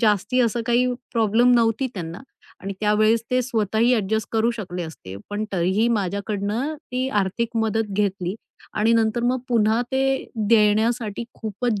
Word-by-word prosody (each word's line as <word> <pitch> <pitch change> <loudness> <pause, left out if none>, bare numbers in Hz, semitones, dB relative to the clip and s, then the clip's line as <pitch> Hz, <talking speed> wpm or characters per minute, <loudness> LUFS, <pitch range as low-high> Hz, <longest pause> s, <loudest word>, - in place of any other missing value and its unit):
जास्ती 220 +3 +2
असं 235 -1 +1
काही 240 +1 +3 0.3
प्रॉब्लेम 230 +2 +3
नव्हती 230 +2 +2
त्यांना 170 -1 -6 0.4
आणि 195 +1 -4
त्यावेळेस 215 +2 +3
ते 255 0 +3
स्वतःही 230 -1 +1
अ‍ॅडजस्ट 220 -1 -1
करू 225 +1 +2
शकले 180 -4 -5
असते, 125 - -9
पण 205 +1 -2
तरीही 190 +5 +2
माझ्याकडनं 205 - -1
ती 260 -4 -3
आर्थिक 225 +5 -2
मदत 220 -1 0
घेतली 195 -2 -1 0.4
आणि 220 +2 +2
नंतर 225 0 +2
मग 250 +1 +1
पुन्हा 225 -1 +3
ते 265 0 +2 0.5
देण्यासाठी 220 +1 +2
खूपच 220 0 -2
220 Hz, 140 wpm, -23 LUFS, 205-235 Hz, 0.5 s, काही